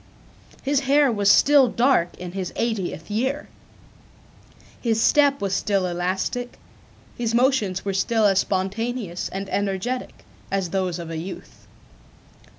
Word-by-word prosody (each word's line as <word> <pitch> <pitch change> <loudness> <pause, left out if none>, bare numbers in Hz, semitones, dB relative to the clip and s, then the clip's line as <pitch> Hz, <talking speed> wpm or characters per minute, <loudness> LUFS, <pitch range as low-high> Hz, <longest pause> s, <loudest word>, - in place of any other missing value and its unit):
His 280 0 +2
hair 280 0 +3
was 205 -3 +2
still 280 +3 +6
dark 235 -7 +1
in 180 -1 -7
his 185 -1 -4
eightieth 205 -6 -3
year. 265 +7 -1 1.3
His 225 -2 +1
step 285 +3 +4
was 200 -2 -2
still 195 -1 +1
elastic, 185 +7 -2 0.6
his 230 -1 -1
motions 235 -8 +1
were 195 - -1
still 220 +3 +1
as 195 -2 +4
spontaneous 195 0 -2
and 195 +1 -5
energetic, 205 +6 -3 0.3
as 195 -3 -1
those 185 -2 -1
of 170 -1 -7
a 165 - -4
youth. 180 +4 -9
205 Hz, 130 wpm, -23 LUFS, 185-245 Hz, 1.3 s, still